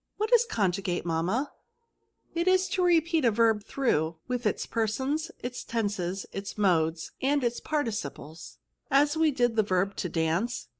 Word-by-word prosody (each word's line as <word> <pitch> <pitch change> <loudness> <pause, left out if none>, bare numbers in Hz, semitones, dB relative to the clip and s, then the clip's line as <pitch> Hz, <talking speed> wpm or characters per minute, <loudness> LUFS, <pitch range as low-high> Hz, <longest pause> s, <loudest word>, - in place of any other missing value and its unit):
" - - -54
What 435 +3 -1
is 480 0 +6
conjugate, 190 - -1
mamma? 175 - -1 0.3
" 465 0 -48
" - - -42
It 340 +1 -1
is 370 0 +4
to 370 - 0
repeat 335 -2 +3
a 240 - +5
verb 220 -1 +2
through, 165 - 0
with 245 -2 -1
its 210 - -1
persons, 265 +8 -1
its 245 0 -5
tenses, 200 -5 -2
its 195 +2 -6
modes, 165 -5 +1
and 280 +1 +2
its 240 0 0
parti 295 -7 -1
ciples." 155 -4 -7 0.2
*' - - -55
As 290 +2 +3
we 320 0 +3
did 245 -4 +1
the 220 - +4
verb 195 -1 0
to 180 - -2
dance 165 +9 -1
230 Hz, 185 wpm, -28 LUFS, 185-290 Hz, 0.3 s, is